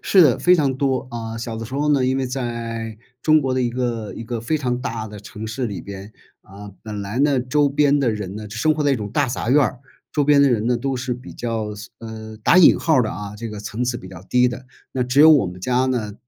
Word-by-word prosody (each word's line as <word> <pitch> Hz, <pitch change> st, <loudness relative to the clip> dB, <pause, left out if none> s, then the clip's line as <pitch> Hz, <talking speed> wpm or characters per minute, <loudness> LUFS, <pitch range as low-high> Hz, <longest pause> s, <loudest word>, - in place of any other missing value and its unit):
是 190 Hz, -, +5 dB
的 140 Hz, -7 st, +4 dB
非 180 Hz, -, +5 dB
常 140 Hz, -6 st, +1 dB
多 130 Hz, -1 st, -1 dB
啊， 115 Hz, -1 st, -5 dB
小 115 Hz, 0 st, -5 dB
的 115 Hz, 0 st, -5 dB
时 130 Hz, -, -8 dB
候 150 Hz, +1 st, +1 dB
呢， 135 Hz, -3 st, +2 dB
因 130 Hz, +1 st, +1 dB
为 135 Hz, -, 0 dB
在 115 Hz, -3 st, -4 dB, 0.2 s
中 155 Hz, +2 st, +4 dB
国 135 Hz, -2 st, -1 dB
的 130 Hz, -, 0 dB
一 125 Hz, -, +1 dB
个 120 Hz, -3 st, -3 dB
一 115 Hz, -, -7 dB
个 115 Hz, 0 st, -4 dB
非 140 Hz, +8 st, 0 dB
常 125 Hz, -4 st, -2 dB
大 115 Hz, -4 st, -4 dB
的 105 Hz, -1 st, -9 dB
城 105 Hz, +2 st, -8 dB
市 120 Hz, +3 st, -3 dB
里 100 Hz, -6 st, -6 dB
边， 100 Hz, +1 st, -9 dB, 0.3 s
啊， 100 Hz, +1 st, -11 dB
本 105 Hz, -2 st, -5 dB
来 100 Hz, +5 st, -4 dB
呢， 140 Hz, -1 st, +3 dB
周 140 Hz, +4 st, +2 dB
边 145 Hz, 0 st, +3 dB
的 135 Hz, -4 st, +2 dB
人 105 Hz, -3 st, -4 dB
呢， 105 Hz, 0 st, -7 dB
是 105 Hz, -, -8 dB
生 155 Hz, +5 st, +3 dB
活 150 Hz, -, -1 dB
在 145 Hz, -1 st, +3 dB
一 -, -, +1 dB
种 105 Hz, -3 st, -5 dB
大 145 Hz, +5 st, +1 dB
杂 120 Hz, -1 st, -2 dB
院 145 Hz, +3 st, +5 dB
儿， 130 Hz, -2 st, -2 dB, 0.3 s
周 145 Hz, -, +1 dB
边 145 Hz, 0 st, +5 dB
的 140 Hz, -1 st, +5 dB
人 115 Hz, -2 st, +1 dB
呢， 125 Hz, 0 st, +2 dB
都 135 Hz, +2 st, -2 dB
是 125 Hz, 0 st, -3 dB
比 125 Hz, +2 st, -8 dB
较， 110 Hz, -3 st, -3 dB
嘶， 105 Hz, +2 st, -10 dB
呃， 110 Hz, -1 st, -8 dB
打 170 Hz, -, +4 dB
引 175 Hz, -, +7 dB
号 160 Hz, -, +2 dB
儿 125 Hz, -, +5 dB
的 110 Hz, -, -2 dB
啊， 105 Hz, 0 st, -7 dB
这 115 Hz, +2 st, -6 dB
个 105 Hz, -1 st, -7 dB
层 110 Hz, +3 st, -3 dB
次 120 Hz, -1 st, -2 dB
比 95 Hz, -, -11 dB
较 95 Hz, -2 st, -11 dB
低 125 Hz, 0 st, +4 dB
的。 125 Hz, +1 st, -7 dB, 0.3 s
那 130 Hz, -, 0 dB
只 125 Hz, +3 st, +2 dB
有 160 Hz, +1 st, +9 dB
我 145 Hz, -10 st, +5 dB
们 90 Hz, +1 st, -8 dB
家 125 Hz, +6 st, +1 dB
呢， 115 Hz, -6 st, -2 dB
120 Hz, 295 characters per minute, -21 LUFS, 110-135 Hz, 0.3 s, 有